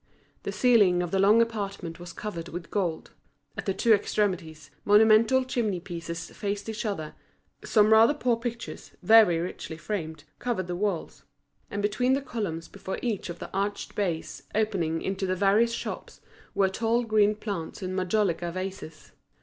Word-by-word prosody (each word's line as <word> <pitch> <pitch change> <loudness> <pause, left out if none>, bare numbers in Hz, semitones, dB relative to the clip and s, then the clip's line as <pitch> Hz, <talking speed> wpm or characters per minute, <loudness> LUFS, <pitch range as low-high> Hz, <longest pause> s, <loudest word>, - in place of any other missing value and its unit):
The - - -4
ceiling 205 -8 +4
of 175 - -5
the 195 - +1
long 210 +4 +6
apartment 200 -7 -5
was 175 0 -8
covered 170 -4 -6
with 170 0 -7
gold; 175 -6 -2 0.4
at - - -6
the 195 - +2
two 230 - +4
extremities, 180 -7 -1
monumental 220 +5 +5
chimney 220 -7 -1
pieces 170 -1 -6
faced 200 0 -4
each 220 0 -3
other; 160 -7 -4 0.5
some 215 0 +4
rather 225 +6 +6
poor 245 -4 +1
pictures, 235 0 -6
very 215 -4 +7
richly 165 -1 -5
framed, 160 -4 -5 0.2
covered 235 -7 -2
the 175 0 -4
walls; 195 -3 -3 0.5
and 205 0 -3
between 250 +5 +2
the 275 - +1
columns 185 -11 -4
before 190 +1 -6
each 220 -7 -2
of 170 - -6
the - - -8
arched 200 +1 -2
bays 175 -6 -3
opening 185 -7 0
into 190 0 -2
the 185 - 0
various 205 +5 +3
shops, - - -6 0.4
were 195 - +4
tall 225 +5 0
green 215 -2 +3
plants 200 -4 -5
in 185 0 -3
majolica 185 -2 0
vases. 185 -4 -7
200 Hz, 160 wpm, -27 LUFS, 175-220 Hz, 0.5 s, very